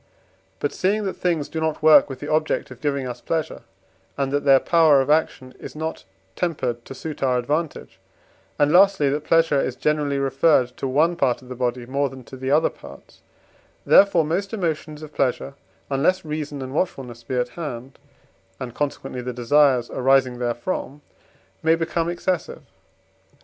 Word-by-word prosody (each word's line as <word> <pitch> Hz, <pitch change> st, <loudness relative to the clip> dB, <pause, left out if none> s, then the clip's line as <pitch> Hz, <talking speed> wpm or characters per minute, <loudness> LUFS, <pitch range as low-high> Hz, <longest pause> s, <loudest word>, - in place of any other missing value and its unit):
But 145 Hz, -, -2 dB
seeing 205 Hz, +3 st, 0 dB
that 195 Hz, -, -2 dB
things 165 Hz, -5 st, -1 dB
do 160 Hz, -, -5 dB
not 160 Hz, -1 st, -2 dB
work 155 Hz, -1 st, +7 dB
with 130 Hz, -1 st, -7 dB
the 145 Hz, -, -5 dB
object 155 Hz, -3 st, 0 dB
of 125 Hz, -, -12 dB
giving 140 Hz, -3 st, -1 dB
us 125 Hz, -1 st, -7 dB
pleasure, 160 Hz, -2 st, -3 dB, 0.6 s
and 135 Hz, -1 st, -1 dB
that 145 Hz, 0 st, -1 dB
their 135 Hz, -1 st, +6 dB
power 160 Hz, -3 st, +4 dB
of 135 Hz, +2 st, +1 dB
action 135 Hz, -4 st, 0 dB
is -, -, -9 dB
not 160 Hz, +1 st, -5 dB, 0.3 s
tempered 130 Hz, -9 st, -2 dB
to 135 Hz, -, -9 dB
suit 155 Hz, +3 st, -7 dB
our 130 Hz, -2 st, +2 dB
advantage, 150 Hz, +5 st, -3 dB, 0.6 s
and, 145 Hz, 0 st, +3 dB
lastly, 190 Hz, -5 st, +5 dB
that 145 Hz, +2 st, -2 dB
pleasure 165 Hz, -3 st, +3 dB
is 125 Hz, -, -3 dB
generally 150 Hz, -1 st, 0 dB
referred 135 Hz, -2 st, +2 dB
to 135 Hz, -, -3 dB
one 155 Hz, +6 st, +2 dB
part 130 Hz, -6 st, 0 dB
of 125 Hz, -, -15 dB
the 125 Hz, -, -6 dB
body 125 Hz, -1 st, -2 dB
more 140 Hz, +2 st, -1 dB
than 130 Hz, 0 st, -11 dB
to 130 Hz, -, -12 dB
the 130 Hz, 0 st, -4 dB
other 150 Hz, +3 st, +3 dB
parts; -, -, -15 dB, 0.6 s
therefore 185 Hz, -5 st, +5 dB
most 195 Hz, +7 st, -2 dB
emotions 155 Hz, -5 st, -3 dB
of 155 Hz, -1 st, -10 dB
pleasure 135 Hz, +1 st, -1 dB, 0.4 s
(unless 165 Hz, +7 st, +1 dB
reason 150 Hz, -2 st, -4 dB
and 130 Hz, 0 st, -7 dB
watchfulness 130 Hz, -8 st, -3 dB
be 125 Hz, -, -4 dB
at 125 Hz, 0 st, 0 dB
hand), 135 Hz, -5 st, -7 dB, 0.6 s
and 125 Hz, -2 st, -6 dB
consequently 135 Hz, -3 st, -4 dB
the 125 Hz, 0 st, -5 dB
desires 125 Hz, 0 st, +3 dB
arising 130 Hz, -1 st, +2 dB
therefrom, 125 Hz, +4 st, -3 dB, 0.6 s
may 160 Hz, +1 st, +4 dB
become 165 Hz, 0 st, -1 dB
excessive. 175 Hz, 0 st, -3 dB
145 Hz, 170 wpm, -22 LUFS, 130-160 Hz, 0.6 s, work